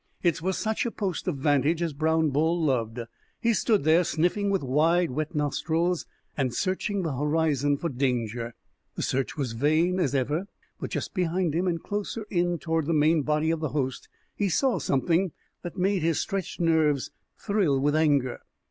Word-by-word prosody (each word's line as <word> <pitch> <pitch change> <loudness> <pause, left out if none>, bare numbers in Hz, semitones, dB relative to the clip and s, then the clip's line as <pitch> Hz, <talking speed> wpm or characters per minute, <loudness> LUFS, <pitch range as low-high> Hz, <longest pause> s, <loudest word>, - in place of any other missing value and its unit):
It 170 -2 +2
was 190 +2 -1
such 220 0 -1
a 235 - -1
post 195 -5 -3
of 170 -6 -1
vantage 145 +3 +2
as 170 -3 -1
Brown 160 +1 +1
Bull 160 +5 +1
loved. 120 -6 0 0.4
He 235 -1 +2
stood 215 - +2
there 160 +4 +5
sniffing 180 +5 0
with 195 -5 0
wide, 160 +5 +2
wet 155 +4 -3
nostrils, 160 +4 0 0.3
and 130 -4 -1
searching 190 - -1
the 155 -5 -2
horizon 145 -1 +1
for 170 - -2
danger. 120 -4 -2 0.4
The - - -3
search 135 +3 -1
was 135 -5 -2
vain, 155 +9 +2
as 145 -6 +1
ever; 145 +8 0 0.3
but - - -4
just - - -4
behind 180 -2 0
him, 175 +4 0
and 170 -2 -1
closer 210 +1 -4
in 175 -2 +1
toward 160 -2 -1
the 165 - +1
main 155 +1 +4
body 150 +2 +1
of 165 - -1
the 155 -2 -2
host, 130 -2 -2 0.3
he 205 -2 0
saw 260 - +2
something 165 +6 +1 0.3
that 175 +1 -7
made 190 0 +1
his 165 0 +1
stretched 195 -2 -3
nerves 160 -5 +2 0.3
thrill 195 -10 +1
with 145 +2 +1
anger. 145 -5 +2
160 Hz, 180 wpm, -27 LUFS, 145-180 Hz, 0.4 s, there